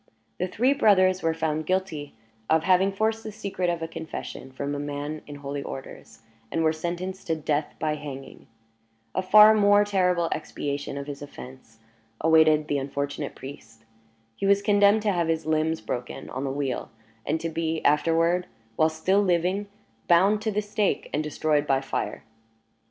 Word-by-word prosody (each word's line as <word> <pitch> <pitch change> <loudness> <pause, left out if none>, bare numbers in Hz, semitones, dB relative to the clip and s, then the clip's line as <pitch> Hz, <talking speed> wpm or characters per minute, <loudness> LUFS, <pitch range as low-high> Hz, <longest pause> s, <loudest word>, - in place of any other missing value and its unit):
The 185 - 0
three 245 +9 +2
brothers 185 -6 +4
were 165 0 0
found 155 -1 -2
guilty 175 -7 -2 0.3
of 160 0 +3
having 190 +2 +4
forced 220 +3 -1
the 215 - -6
secret 200 -4 -3
of 170 -1 -2
a - - -2
confession 160 -4 -7
from 140 +2 -4
a 145 - -3
man 145 +1 -4
in 145 - -8
holy 140 0 -5
orders, 135 -4 -9 0.3
and 165 - 0
were 160 0 +3
sentenced 175 +4 -5
to 165 - +1
death 150 -1 -2
by 155 -1 -1
hanging. 140 -3 -8 0.7
A - - 0
far 210 +3 +8
more 205 -1 +5
terrible 180 -4 +1
expiation 145 -2 -4
of 140 - -5
his 140 -1 -7
offense 130 -5 -11 0.4
awaited 155 -1 +4
the 145 -2 0
unfortunate 140 +1 -4
priest. 115 -5 -11 0.5
He 195 - -2
was 200 0 +4
condemned 205 0 +4
to 210 - +2
have 170 -3 0
his 160 -1 -1
limbs 160 +1 0
broken 125 0 -5
on 130 +2 -4
the - - -1
wheel, 135 -2 -3 0.3
and 160 +2 -1
to 165 - -3
be 160 0 -2
afterward, 165 +4 +2 0.3
while 155 - +4
still 185 +6 +1
living, 185 +2 +1 0.4
bound 195 +5 +4
to 220 0 -1
the 210 +1 -1
stake 205 0 -1
and 150 - +1
destroyed 150 -1 0
by 135 -1 +3
fire. 135 - -4
160 Hz, 170 wpm, -26 LUFS, 145-190 Hz, 0.7 s, far